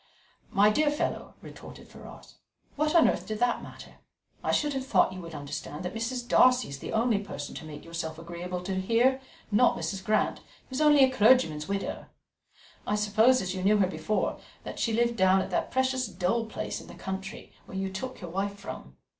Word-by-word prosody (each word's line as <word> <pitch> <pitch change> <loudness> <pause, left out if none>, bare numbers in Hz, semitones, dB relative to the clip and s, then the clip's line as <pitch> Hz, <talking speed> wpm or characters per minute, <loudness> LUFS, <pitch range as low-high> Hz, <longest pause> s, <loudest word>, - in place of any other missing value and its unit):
"My 205 +2 +4
dear 300 +6 +2
fellow," 295 - -3
retorted - - -11
Ferrars, - - -13 0.4
"what 305 +3 0
on 335 - +7
earth - - -1
did 215 - -3
that 245 +2 +1
matter? - - -12 0.5
I - - +1
should 295 -1 +1
have 265 -1 -4
thought 225 - +3
you 185 - -7
would 165 -2 -9
understand 145 +3 -6
that 180 - -4
Mrs. 240 +2 -3
Darcy 250 0 +5
is 140 -1 -7
the - - -7 0.3
person 145 -7 -6
to - - -8
make 150 -1 -9
yourself 165 -1 -5
agreeable 175 +2 -6
to 190 0 -2
here, 240 +6 +2 0.3
not 240 +4 +4
Mrs. 195 -1 -4
Grant, 215 +2 +1
who - - -23 0.3
is 260 - -2
only 295 -2 +6
a 260 - +4
clergyman's 210 -11 +4
widow. 200 0 -3 0.8
I 210 - +1
suppose, 220 +4 +3
as 185 -1 -3
you 185 - -4
knew 210 +2 +4
her 200 - +4
before, 180 +3 -2 0.2
that - - -7
she 230 - +1
lived 235 +1 +1
down 190 0 +5
at - - -3
that - - 0
precious 260 -1 0
dull 195 +5 -1
place 220 - -5
in - - -14
the - - -11
country, 190 0 -6
where 190 - -7
you 190 0 -2
took 255 +7 -6
your 175 -3 -7
wife 200 +2 -2
from." 200 - -9
205 Hz, 200 wpm, -28 LUFS, 185-250 Hz, 0.8 s, on